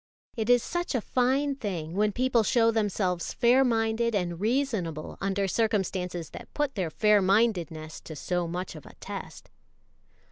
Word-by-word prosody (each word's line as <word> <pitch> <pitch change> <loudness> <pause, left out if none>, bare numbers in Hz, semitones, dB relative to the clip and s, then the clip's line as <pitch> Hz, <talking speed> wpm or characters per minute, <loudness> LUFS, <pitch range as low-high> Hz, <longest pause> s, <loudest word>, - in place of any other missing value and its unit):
It 225 -1 -2
is 245 -1 +5
such 345 -4 -2
a - - +2
fine 260 +5 +1
thing 175 - -4
when 210 +2 +2
people 250 +1 +2
show 230 +2 +3
themselves 200 -5 -1
fair 245 +2 +5
minded 225 -1 +1
and 175 -3 -1
reasonable 215 - -1
under 195 0 0
circumstances 185 -6 -1
that - - -10
put 295 -2 0
their 185 -6 -2
fair 210 +5 +4
mindedness 180 -6 +1
to 155 - -7
so 175 +3 -2
much 180 +2 -4
of 155 - -11
a - - -14
test. - - -8
210 Hz, 155 wpm, -28 LUFS, 180-235 Hz, -, is